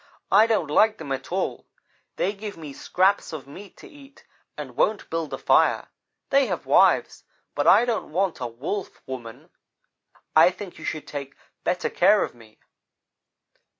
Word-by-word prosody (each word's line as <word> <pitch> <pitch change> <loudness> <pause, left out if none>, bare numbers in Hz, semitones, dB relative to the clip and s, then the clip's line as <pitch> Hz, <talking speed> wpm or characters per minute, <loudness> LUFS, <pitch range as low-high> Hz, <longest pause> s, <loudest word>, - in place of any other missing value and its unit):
I 220 - +6
don't 195 -10 0
like 220 +6 +4
them 140 - -8
at 135 +3 -4
all. 190 +2 -3 0.5
They 200 - 0
give 205 -1 -8
me 150 -4 -8
scraps 190 +5 +1
of 150 -4 -6
meat 190 +9 -12
to - - -13
eat 285 -5 -17 0.3
and - - -7
won't 210 -1 +1
build 165 -2 -3
a - - -3
fire. - - +2 0.4
They 275 -1 +4
have - - -4
wives, - - +3 0.3
but - - -1
I 240 - +7
don't 230 -9 -2
want 185 +2 0
a 125 - -3
Wolf 140 - -6
woman. 120 -4 -9 0.8
I 160 +3 +8
think 185 -1 -9
you 160 - -8
should 155 - -4
take 140 -2 -7 0.3
better 180 +1 -1
care 205 +3 +4
of - - -5
me.' 115 -2 -19
180 Hz, 165 wpm, -24 LUFS, 140-210 Hz, 0.8 s, I